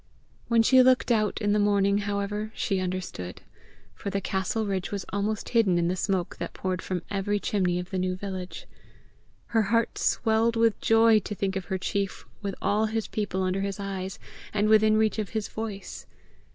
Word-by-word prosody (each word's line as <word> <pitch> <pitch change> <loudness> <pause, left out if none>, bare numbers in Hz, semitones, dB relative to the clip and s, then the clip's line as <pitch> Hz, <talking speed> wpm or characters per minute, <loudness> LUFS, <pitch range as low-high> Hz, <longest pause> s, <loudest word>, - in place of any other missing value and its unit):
When 230 -1 +4
she 260 +3 +6
looked 255 -1 +4
out 215 -3 +1
in 205 - +2
the 210 - +3
morning, 200 -1 +3
however, 205 +1 -2
she 195 -3 0
understood, 180 - -4 0.5
for - - -5
the 200 0 -1
castle 195 +3 -1
ridge 190 -2 -2
was 200 -2 -3
almost 205 +1 -1
hidden 220 -7 +3
in 170 0 +1
the 185 - 0
smoke 185 -1 -1
that - - -5
poured 185 -1 -2
from 180 -2 -3
every 205 +1 0
chimney 185 -4 0
of 180 +1 -5
the 190 - -1
new 185 0 0
village. 185 -1 -6 0.8
Her 225 - +3
heart 230 +2 +1
swelled 225 +1 +2
with 230 -1 +2
joy 225 -1 +5
to 210 +1 -6
think 195 0 -1
of 190 -2 -3
her 190 - -2
chief 195 +1 -2 0.2
with 200 -2 -3
all 215 +2 +2
his 220 0 -2
people 195 -3 -2
under 185 +1 0
his 195 0 -3
eyes, 195 -1 -4 0.4
and 210 +1 +2
within 215 0 +5
reach 220 0 +2
of 210 -4 -2
his 220 -2 -2
voice. 215 -3 -6
200 Hz, 190 wpm, -27 LUFS, 190-220 Hz, 0.8 s, she